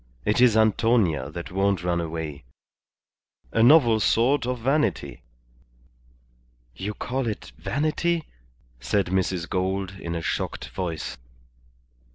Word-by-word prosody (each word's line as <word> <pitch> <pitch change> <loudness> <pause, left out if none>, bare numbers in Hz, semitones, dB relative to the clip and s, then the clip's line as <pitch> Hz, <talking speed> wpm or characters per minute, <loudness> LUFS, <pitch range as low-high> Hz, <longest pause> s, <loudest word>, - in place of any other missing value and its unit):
It 105 +4 +2
is 120 -3 +5
Antonia 110 - +2
that 85 +4 -7
won't 95 -1 +1
run 85 -1 0
away. 80 -4 -5 1.1
A 115 - +2
novel 120 -3 +6
sort 120 +5 +2
of 125 0 -1
vanity." 135 - -1 1.5
"You 105 - -4
call 130 0 -3
it 105 - -5
vanity," 155 - 0 0.6
said 80 +12 0
Mrs. 95 -2 0
Gould, 95 0 -1
in 85 -2 -4
a 85 - -3
shocked - - -3
voice. 85 -8 -4
100 Hz, 115 wpm, -25 LUFS, 85-120 Hz, 1.5 s, novel